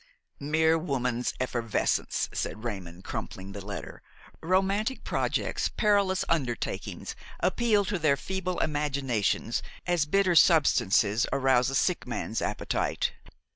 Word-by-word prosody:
"Mere 160 +3 +2
woman's 125 -6 -1
effervescence!" 120 -3 0
said 110 - -3
Raymon, 95 -6 -6
crumpling 95 +1 -6
the 100 0 -7
letter. 100 0 -7 0.4
"Romantic 195 +8 +1
projects, - - -1
perilous 200 -3 +2
undertakings, 130 -8 -2 0.2
appeal 210 0 +2
to 195 -1 -2
their 150 -3 +3
feeble 185 0 -3
imaginations 135 -7 0 0.2
as 175 -4 +1
bitter 190 +2 +3
substances 115 - +4
arouse 130 -2 +3
a 135 - -3
sick 180 +2 +1
man's 115 -2 -3
appetite. - - -1
145 Hz, 110 wpm, -28 LUFS, 120-185 Hz, 0.4 s, substances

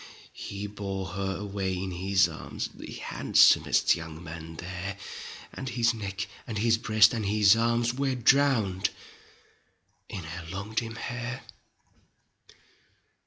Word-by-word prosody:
He 100 +1 -6
bore 100 -2 -4
her 95 +1 -2
away 95 -2 -2
in 95 +1 -3
his 95 +1 +3
arms, 80 -2 -5
The - - -9
handsomest - - +4
young 80 0 -8
man 80 0 -8
there. 90 +3 -5 0.6
And 130 - -5
his 120 0 +2
neck 100 -2 -4 0.2
and 110 - -3
his 115 +2 +3
breast 110 -1 +5
and 115 -2 -2
his 105 0 +6
arms 115 +1 +2
Were 135 0 0
drowned 120 -7 +3 1.2
in 90 - -5
her 85 +1 -7
long 100 +4 -6
dim 115 0 -1
hair. 120 +2 -5
100 Hz, 125 wpm, -28 LUFS, 95-115 Hz, 1.2 s, his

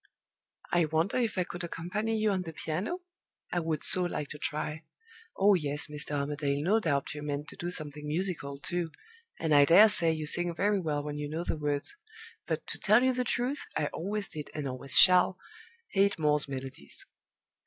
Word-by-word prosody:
I 175 -2 +3
wonder 160 +7 0
if 230 -5 -1
I 180 - +2
could 175 0 -7
accompany 190 +7 -3
you 215 -1 +2
on 190 -2 0
the 165 -2 -7
piano? 185 - -3 0.5
I 175 - 0
would 160 -3 -2
so 185 - +9
like 150 -5 -3
to 150 - -8
try. 155 +1 -3 0.5
Oh, 200 +1 +5
yes, 150 -4 +1
Mr. 150 0 -5
Armadale, 145 0 -1
no 205 +7 +3
doubt 145 -9 -1
you 150 - -7
meant 145 0 -4
to - - -8
do 175 - -4
something 150 -3 -3
musical, 155 -4 -3
too, 175 +2 -3 0.5
and 160 -2 0
I 145 -1 +7
dare 185 +9 +7
say 170 -5 +3
you 155 -1 -3
sing 175 +2 -1
very 205 +3 +1
well 150 -4 -2
when 150 0 -5
you 145 0 -4
know 160 +3 -3
the - - -2
words; 145 -2 -2 0.5
but, - - -2
to - - -5
tell 215 +4 +4
you 260 0 +3
the 250 0 -1
truth, 250 +4 -2
I 150 - 0
always 200 +4 -3
did, 150 -3 -7
and 150 -2 -3
always 130 +1 -4
shall, 180 0 +6 0.5
hate 200 0 +2
Moore's 150 -2 +2
Melodies!" 130 - -8
160 Hz, 195 wpm, -29 LUFS, 150-190 Hz, 0.5 s, so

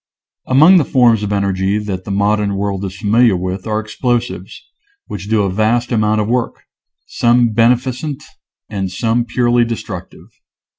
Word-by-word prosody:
Among 155 +8 +6
the 165 - +3
forms 120 -5 +3
of 105 -1 -3
energy 100 0 0
that 100 -3 -5
the - - -8
modern 100 0 0
world 100 -1 -3
is 95 0 -7
familiar 110 -1 +3
with 95 +3 -5
are 110 0 -1
Explosives, 120 +2 -3 0.4
which 100 +1 -8
do 110 -2 +2
a 95 - -1
vast 110 +5 0
amount 110 -2 +1
of 105 - -2
work 120 0 -2 0.3
— - - -65
some 120 0 +2
beneficent, 125 +6 0 0.4
and 95 -3 -4
some 115 +5 0
purely 120 0 +1
destructive. 115 -1 -7
110 Hz, 155 wpm, -16 LUFS, 100-120 Hz, 0.4 s, Among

